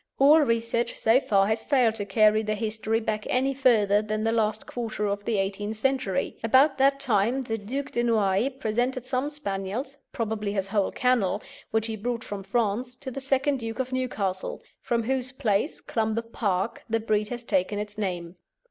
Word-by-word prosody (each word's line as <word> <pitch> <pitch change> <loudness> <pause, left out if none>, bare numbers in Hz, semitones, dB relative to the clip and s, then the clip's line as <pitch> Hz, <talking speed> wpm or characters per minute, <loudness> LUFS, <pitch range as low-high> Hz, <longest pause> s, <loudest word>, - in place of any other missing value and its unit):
All 290 +4 +7
research 235 -2 0
so 225 +3 +4
far 195 -7 +2
has 220 +2 0
failed 250 -6 +3
to 210 -2 -3
carry 215 +2 +4
their 215 0 -1
history 220 +1 -1
back 215 -1 -3
any 265 +2 +2
further 215 -6 +3
than 215 0 -2
the 225 - +2
last 220 -2 0
quarter 225 -3 -3
of 205 0 -2
the 225 -3 0
eighteenth 200 +2 -2
century. 260 -6 0
About 270 +5 +4
that 275 +1 +4
time 245 0 +1
the 225 -2 -3
Duc 270 +7 -4
de 240 - 0
Noailles 215 0 +2
presented 245 +2 -1
some 260 +2 -1
Spaniels, 255 0 -4
probably 215 -3 -2
his 195 -1 -2
whole 200 -1 +1
kennel, 250 -7 +1 0.3
which 220 0 0
he 225 -1 -3
brought 235 +2 -3
from 205 -1 -6
France, 230 +4 -1
to 260 +1 -7
the 275 - -6
second 275 +1 +1
Duke 225 -1 -5
of 260 -1 -3
Newcastle, 205 -8 -2 0.2
from 235 -1 0
whose 255 +1 -1
place, 245 0 0
Clumber 220 0 -1
Park, 205 -3 -2
the 225 0 +1
breed 215 -1 0
has 240 -1 -5
taken 205 -2 0
its 210 0 -5
name. 180 -4 -4
225 Hz, 185 wpm, -26 LUFS, 205-255 Hz, 0.3 s, All